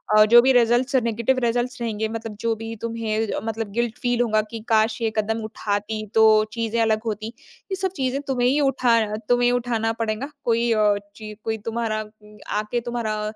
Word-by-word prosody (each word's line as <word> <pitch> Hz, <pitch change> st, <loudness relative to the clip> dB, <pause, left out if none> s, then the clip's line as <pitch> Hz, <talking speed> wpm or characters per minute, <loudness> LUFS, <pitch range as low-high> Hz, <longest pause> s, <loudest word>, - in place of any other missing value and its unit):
और -, -, +7 dB
अ, -, -, +5 dB
जो 235 Hz, +2 st, +8 dB
भी 260 Hz, +2 st, +4 dB
रिजल्ट्स 245 Hz, +2 st, +3 dB
नेगेटिव 235 Hz, +1 st, +1 dB
रिजल्ट्स 245 Hz, +2 st, -1 dB
रहेंगे, 220 Hz, -2 st, -1 dB
मतलब 225 Hz, -1 st, -6 dB
जो 230 Hz, 0 st, 0 dB
भी 225 Hz, +1 st, -6 dB
तुम्हें 225 Hz, -1 st, -2 dB
अ, -, -, -1 dB
मतलब 225 Hz, -1 st, -4 dB
गिल्ट 235 Hz, +1 st, -2 dB
फ़ील 245 Hz, -1 st, +1 dB
होंगा 215 Hz, -3 st, +2 dB
कि 230 Hz, -, -5 dB
काश! 220 Hz, +1 st, +2 dB
ये 225 Hz, -1 st, 0 dB
कदम 220 Hz, +1 st, 0 dB
उठाती, 215 Hz, 0 st, -3 dB
तो 220 Hz, -1 st, +6 dB
चीज़ें 230 Hz, 0 st, -1 dB
अलग 220 Hz, -1 st, +1 dB
होती। 215 Hz, -1 st, -3 dB, 0.4 s
ये -, -, +1 dB
सब 380 Hz, 0 st, -2 dB
चीज़ें 265 Hz, -1 st, -1 dB
तुम्हें 250 Hz, -2 st, +1 dB
ही 275 Hz, +4 st, +2 dB
उठा 255 Hz, -4 st, +3 dB
उठाना 215 Hz, -2 st, 0 dB
तुम्हें 245 Hz, 0 st, +3 dB
ही -, -, +3 dB
उठाना 235 Hz, -2 st, 0 dB
पड़ेंगा। 230 Hz, +5 st, -3 dB
कोई 235 Hz, 0 st, +1 dB
अ, 210 Hz, -2 st, +3 dB, 0.2 s
ची 215 Hz, -1 st, -8 dB
कोई 220 Hz, 0 st, -2 dB
तुम्हारा 225 Hz, -1 st, -1 dB
उम, 210 Hz, 0 st, -15 dB, 0.2 s
आके 215 Hz, +3 st, -1 dB
तुम्हारा 230 Hz, -3 st, -3 dB
225 Hz, 200 wpm, -23 LUFS, 215-240 Hz, 0.4 s, जो